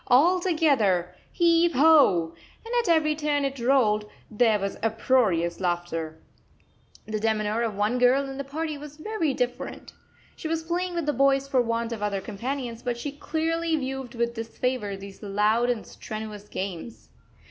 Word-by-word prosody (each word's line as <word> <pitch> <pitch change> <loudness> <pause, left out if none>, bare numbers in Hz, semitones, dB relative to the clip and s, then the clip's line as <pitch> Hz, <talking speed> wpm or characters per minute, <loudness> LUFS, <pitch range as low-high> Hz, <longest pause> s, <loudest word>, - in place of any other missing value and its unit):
All 320 +9 +5
together! 265 - +2 0.2
Heave 340 0 +3
ho!" 260 - +5 0.3
And 460 - -6
at 465 - -4
every 310 -2 +3
turn 295 -2 0
it 275 -1 -3
rolled, 225 -5 +2 0.2
there 220 0 +3
was 200 -1 -3
uproarious 220 -6 +1
laughter. 175 -3 -2 0.9
The 215 0 -3
demeanour 215 0 0
of 225 -3 -1
one 210 +5 0
girl 260 +3 +4
in 270 0 -7
the - - -2
party 305 +2 -4
was 295 0 -10
very 320 -5 -1
different. 245 -1 -4 0.4
She - - -6
was 325 0 -1
playing 350 +2 -2
with 340 -3 -1
the 295 - +1
boys 275 0 +3
for 265 -2 +3
want 230 0 -1
of 225 -2 -5
other 205 -1 -1
companions, 235 +3 -5
but 245 -1 -2
she 280 +4 -4
clearly 325 +3 -1
viewed 265 -3 -4
with 235 0 0
disfavour 225 -2 -3
these 195 0 -11
loud 210 +4 +1
and 240 -3 -1
strenuous 215 -1 -8
games. 190 +3 -6
245 Hz, 160 wpm, -26 LUFS, 210-295 Hz, 0.9 s, All